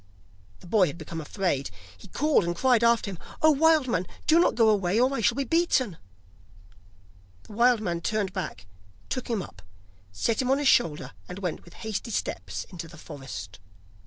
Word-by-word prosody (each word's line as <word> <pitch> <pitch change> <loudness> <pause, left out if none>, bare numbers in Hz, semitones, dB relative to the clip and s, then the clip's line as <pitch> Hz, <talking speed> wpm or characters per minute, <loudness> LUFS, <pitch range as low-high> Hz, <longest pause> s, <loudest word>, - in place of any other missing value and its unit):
The - - -14
boy 185 0 +3
had 145 - -6
become 165 0 -6
afraid; 150 -4 -1 0.3
he 90 - -15
called 300 -7 +2
and 175 0 -2
cried 245 +3 +3
after 235 -3 +3
him: 180 - -8 0.2
'Oh, 315 - +7
wild 310 -1 +4
man, 180 -7 -1 0.2
do 320 +2 +5
not 345 - +3
go 225 -2 +5
away, 200 -1 +2
or 255 +2 +3
I 270 - -1
shall 240 +3 +2
be 275 - +1
beaten!' 265 - +1 1.5
The - - -13
wild 235 +1 +4
man 170 -4 -2
turned 200 0 -1
back, 185 - -5 0.4
took 255 - -3
him 220 -5 -1
up, 90 - -13 0.5
set 215 - 0
him 255 - -2
on 270 - +4
his 290 -1 0
shoulder, 165 -12 +2 0.2
and 180 - -6
went 180 -5 -4
with 175 - -16
hasty 220 +2 -3
steps 95 - -3
into 170 -3 -7
the 170 0 -14
forest. 135 - -9
205 Hz, 190 wpm, -27 LUFS, 170-250 Hz, 1.5 s, Oh